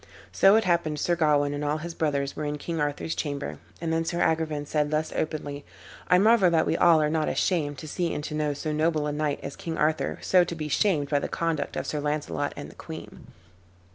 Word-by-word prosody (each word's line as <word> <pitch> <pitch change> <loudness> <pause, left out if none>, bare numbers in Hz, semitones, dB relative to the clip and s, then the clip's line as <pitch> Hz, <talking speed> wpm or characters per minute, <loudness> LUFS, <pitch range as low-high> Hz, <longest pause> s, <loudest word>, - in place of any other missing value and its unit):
So 195 +2 +6
it 220 - +4
happened 170 -5 +1
Sir 175 - +1
Gawain 145 -3 +2
and 145 0 -3
all 150 +1 0
his 170 +2 -6
brothers 140 -4 -1
were - - -4
in 150 0 -2
King 165 +1 -3
Arthur's 145 +2 -2
chamber, 145 -2 -4 0.2
and 165 -1 -2
then 165 0 +1
Sir 170 +1 -3
Agrivain 155 -2 0
said 150 0 0
thus 155 +1 -1
openly, 145 -2 -3 0.4
"I 180 - +5
marvel 210 -1 +5
that 165 -2 +3
we - - +1
all 170 -2 +5
are - - +2
not 155 0 0
ashamed 150 -6 0
to 155 - -8
see 170 +3 -1
and 150 - -3
to 150 - -5
know 150 -1 -1
so 155 +2 -3
noble 155 0 +1
a 150 - -1
knight 150 -1 -1
as 140 - -6
King 165 -1 -5
Arthur 150 - 0
so 185 -1 +5
to 175 -1 -4
be 155 -2 -4
shamed 150 -4 +1
by 145 - +2
the - - -4
conduct 165 -3 -2
of - - -3
Sir 150 - -2
Launcelot 145 -1 -2
and - - -7
the - - -18
queen. - - -10
155 Hz, 230 wpm, -26 LUFS, 145-165 Hz, 0.4 s, So